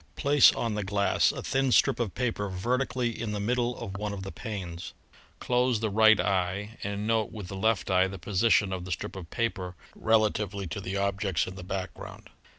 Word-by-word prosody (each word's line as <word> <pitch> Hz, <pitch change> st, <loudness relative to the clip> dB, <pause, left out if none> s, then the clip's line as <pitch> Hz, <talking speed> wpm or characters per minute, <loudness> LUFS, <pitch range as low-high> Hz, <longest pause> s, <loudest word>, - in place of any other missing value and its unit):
Place 145 Hz, -1 st, +6 dB
on 115 Hz, -2 st, -2 dB
the 105 Hz, 0 st, -2 dB
glass 100 Hz, +1 st, +2 dB
a -, -, -7 dB
thin 135 Hz, -1 st, +1 dB
strip 120 Hz, -, +4 dB
of 115 Hz, -6 st, -2 dB
paper 115 Hz, -5 st, -1 dB
vertically 120 Hz, +5 st, -1 dB
in 110 Hz, -2 st, -3 dB
the 105 Hz, -, -2 dB
middle 120 Hz, +3 st, 0 dB
of 100 Hz, -5 st, -6 dB
one 105 Hz, 0 st, -3 dB
of 95 Hz, -1 st, -6 dB
the 95 Hz, -, -6 dB
panes. 95 Hz, -7 st, -6 dB, 0.4 s
Close 125 Hz, -2 st, +1 dB
the 110 Hz, -1 st, -1 dB
right 110 Hz, +1 st, +6 dB
eye 100 Hz, +4 st, -1 dB
and 100 Hz, +1 st, -3 dB
note 110 Hz, -1 st, +1 dB
with 105 Hz, -5 st, -8 dB
the 95 Hz, -, -6 dB
left 100 Hz, -1 st, 0 dB
eye 95 Hz, 0 st, +4 dB
the 95 Hz, +1 st, -7 dB
position 100 Hz, +2 st, +2 dB
of 90 Hz, -1 st, -4 dB
the 90 Hz, -, -7 dB
strip 85 Hz, -, -4 dB
of 90 Hz, -4 st, -8 dB
paper 95 Hz, -6 st, -2 dB, 0.2 s
rela 110 Hz, -1 st, +3 dB
tively 100 Hz, -2 st, -4 dB
to 100 Hz, -, -4 dB
the 95 Hz, +1 st, -3 dB
objects 100 Hz, -, 0 dB
in 90 Hz, -, -7 dB
the 95 Hz, -, -9 dB
background. 95 Hz, 0 st, -7 dB
100 Hz, 205 wpm, -28 LUFS, 95-115 Hz, 0.4 s, Place